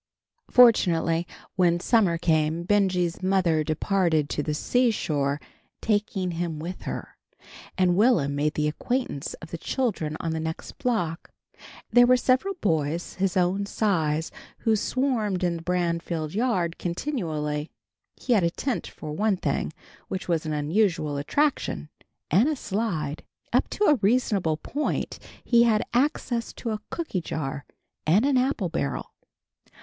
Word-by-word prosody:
Fortunately, 175 -8 +4 0.3
when 175 -2 +3
summer 190 -4 +3
came, 160 -1 +1
Benjy's 185 -3 +1
mother 185 -5 +2
departed 160 -1 +1
to - - -1
the 150 0 -2
seashore, 150 - +1 0.4
taking 205 -4 0
him 165 -1 -3
with 170 +4 -6
her, - - -6 0.6
and 180 -1 +3
Will'm 195 - +3
made 150 +2 0
the 150 0 +1
acquaintance 200 - -2
of 160 - -12
the 170 - -5
children 180 - -1
on 165 - -2
the 160 - -2
next 160 0 -6
block. 175 -10 -1 0.6
There 245 +2 +7
were 255 0 +6
several 260 +11 +1
boys 160 -2 0
his 190 -1 0
own 185 +3 +1
size 160 -8 0 0.3
who 225 -2 +3
swarmed 220 -5 0
in 175 -1 +1
the - - -8
Branfield 170 -2 -1
yard 190 -7 0
continually. 160 - -2 0.5
He 250 - 0
had 210 - +4
a 170 - +3
tent 255 +8 -3
for 155 - -8
one 205 +5 +1
thing, - - -1 0.4
which 190 - -4
was 165 -2 0
an - - -2
unusual 155 -1 +1
attraction, 145 - 0 0.4
and 210 - +5
a 310 - 0
slide. 190 - -2 0.3
Up - - +2
to - - -2
a 305 -7 +6
reasonable 200 -7 +2
point 295 - -3 0.2
he 235 -1 +4
had 225 -2 +4
access 245 -3 0
to 230 - -4
a 215 -1 -3
cooky 315 - -3
jar 145 -3 -4 0.4
and 195 +10 +4
an 280 -2 +3
apple 250 -8 0
barrel. 140 -3 -3
180 Hz, 145 wpm, -26 LUFS, 160-225 Hz, 0.6 s, There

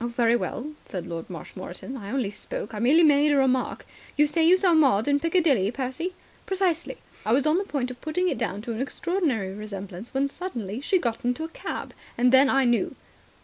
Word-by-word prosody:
"Oh, - - 0
very 235 -1 +2
well," 270 +5 -3
said 180 -3 -6
Lord 165 -2 -6
Marshmoreton. 185 - -7
"I 205 -6 -7
only 240 -4 -1
spoke. 205 +1 -6
I 210 - -4
merely 285 +9 +5
made 295 -1 +5
a 290 - +3
remark." 260 -1 +1 0.3
"You 295 - +6
say 300 +2 +1
you 350 +3 +6
saw 370 -2 +3
Maud 270 -9 +4
in 285 0 +3
Piccadilly, 320 - +2
Percy?" 265 +9 -4 0.3
"Precisely. 375 +2 0 0.3
I 215 - -1
was 270 +4 +3
on 310 +4 +3
the - - -1
point 260 -7 -2
of 250 - -11
putting 360 +4 0
it - - -1
down 200 +2 -2
to 235 - -4
an 225 - -4
extraordinary 275 - -1
resemblance, 200 0 -7
when 275 +1 +1
suddenly 240 - -5
she 375 +6 +2
got 235 -9 -2
into 245 +6 -1
a 325 - -4
cab. - - -6 0.2
Then 260 +3 +5
I 270 -1 +3
knew." 240 -1 +1
260 Hz, 205 wpm, -26 LUFS, 225-315 Hz, 0.3 s, You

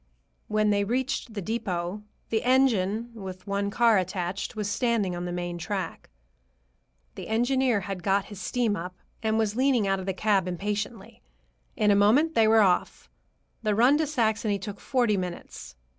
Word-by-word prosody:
When 215 0 +2
they 200 0 +2
reached 245 +1 -2
the 200 - -4
depot, 195 -3 -3 0.3
the 220 - +1
engine, 235 -4 +2
with 190 -4 -8
one 200 0 -1
car 230 -1 +4
attached, 185 +2 -3
was 210 -2 -2
standing 210 -4 0
on 175 0 -4
the 175 - -4
main 175 0 -4
track. 185 -1 -4 1.0
The - - -8
engineer 245 0 +1
had 190 0 -5
got 195 +2 +1
his 205 -2 -10
steam 235 -4 0
up, 180 +1 -6 0.3
and 220 -1 +1
was 215 -2 0
leaning 255 -4 +2
out 195 0 +1
of 190 - -7
the 190 - 0
cab 195 -2 +1
impatiently. 205 +3 -4 0.5
In 210 -1 +3
a - - +5
moment 245 +11 +4
they 225 -6 +4
were 220 0 +6
off. 185 -3 0 0.5
The 215 -2 0
run 245 +6 +5
to 315 - +1
Saxony 220 -6 0
took 200 +1 -7
forty 240 -6 +1
minutes. 180 - -6
210 Hz, 170 wpm, -27 LUFS, 190-230 Hz, 1.0 s, were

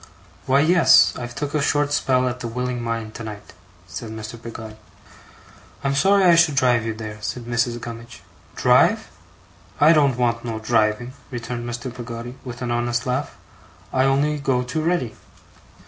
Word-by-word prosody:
'Why 135 +2 +4
yes, 170 +3 +6
I've 120 -1 -7
took 145 +1 -4
a 150 - +1
short 145 +1 +1
spell 130 -3 +2
at 125 0 -3
The 120 - -4
Willing 125 +1 -3
Mind 115 -2 -4
tonight,' 110 -3 -8 0.3
said 100 +5 -7
Mr. 110 +1 -8
Peggotty. 110 -2 -8 1.1
'I'm 140 0 +1
sorry 195 +7 +4
I 175 -2 +7
should 165 -3 +4
drive 125 -3 +3
you 110 - -3
there,' 110 -1 -7
said 120 +2 -4
Mrs. 120 0 -1
Gummidge. 115 +1 -9 0.3
'Drive! - - +3 0.7
I 155 +3 +7
don't 140 -5 +3
want 115 -1 0
no 115 -2 -4
driving,' 110 +2 0 0.2
returned 120 -1 -5
Mr. 120 +1 -5
Peggotty 120 0 -7
with 125 -1 -7
an 120 - -2
honest 120 0 -1
laugh. 130 0 -2 0.6
'I 130 0 +3
only 145 +2 +1
go 130 -3 0
too 130 +6 -3
ready. 155 -9 0
120 Hz, 165 wpm, -22 LUFS, 115-135 Hz, 1.1 s, I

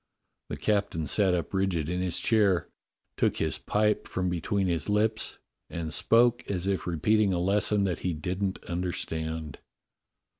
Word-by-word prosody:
The - - -4
captain 100 -7 0
sat 95 +2 +3
up 85 +1 -3
rigid 95 -5 0
in 90 +2 -1
his 90 -2 0
chair, 100 -7 +2 0.5
took - - +1
his - - -1
pipe 105 0 +1
from 90 -1 -1
between 95 +3 -1
his 85 +1 -1
lips, 110 +1 0 0.3
and 80 -2 -4
spoke 120 +4 +4
as 90 -2 -2
if 95 -2 -1
repeating 100 +4 +2
a 90 - 0
lesson 100 +2 +2
that 90 -4 -1
he 90 - -1
didn't 90 +5 -3
understand. 80 -3 -4
95 Hz, 150 wpm, -28 LUFS, 85-105 Hz, 0.5 s, spoke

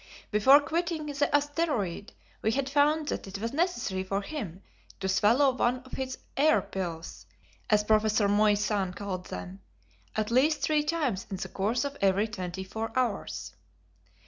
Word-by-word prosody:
Before 245 +7 +7
quitting 325 +1 -2
the 290 -1 0
asteroid 290 - 0 0.3
we 220 - +1
had 275 +1 0
found 295 +2 +2
that - - -3
it 195 - -6
was 230 +4 -4
necessary 240 - 0
for 195 +1 -2
him 200 - -6 0.4
to 190 - -2
swallow 230 +9 +4
one 250 0 0
of 260 - -17
his 260 -1 -4 0.2
"air 310 +3 +4
pills," 170 -4 -6 0.4
as 210 -2 +4
Prof. 215 0 +3 0.2
Moissan 205 -2 +2
called 185 -3 -5
them, 90 +1 -7 0.5
at 215 +1 -1
least 290 +5 +3
three 305 -1 +2
times 295 - -1
in 195 - -4
the - - -5
course 220 +8 0
of 280 0 -5
every 200 +2 +3
twenty 185 -3 -5
four 220 +4 -5
hours. 245 -5 -2
220 Hz, 155 wpm, -28 LUFS, 195-285 Hz, 0.5 s, Before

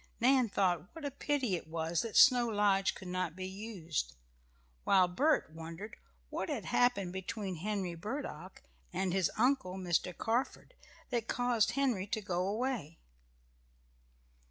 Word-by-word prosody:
Nan 255 -1 +4
thought 185 - 0
what 320 -3 -7
a 285 - -2
pity 275 -6 0
it 170 - -6
was 160 +1 -1
that 230 -2 -2
Snow 245 -2 +7
Lodge 200 -2 +2
could 190 - -9
not 180 -2 -2
be 185 0 -5
used, 190 - -4 0.7
while 185 -2 +5
Bert 270 - +2
wondered 165 +6 -8 0.4
what - - -3
had - - -3
happened 200 -8 +2
between 190 0 -4
Henry 195 0 -2
Burdock 185 - -6 0.3
and 185 0 -1
his 190 -4 +2
uncle, 250 -6 +2
Mr. 180 -1 -1
Carford, 245 - -1 0.4
that 235 -2 -1
caused 240 -2 +2
Henry 245 -8 +1
to 220 - -1
go 185 -3 -1
away. 215 - -2
195 Hz, 140 wpm, -33 LUFS, 180-240 Hz, 0.7 s, Snow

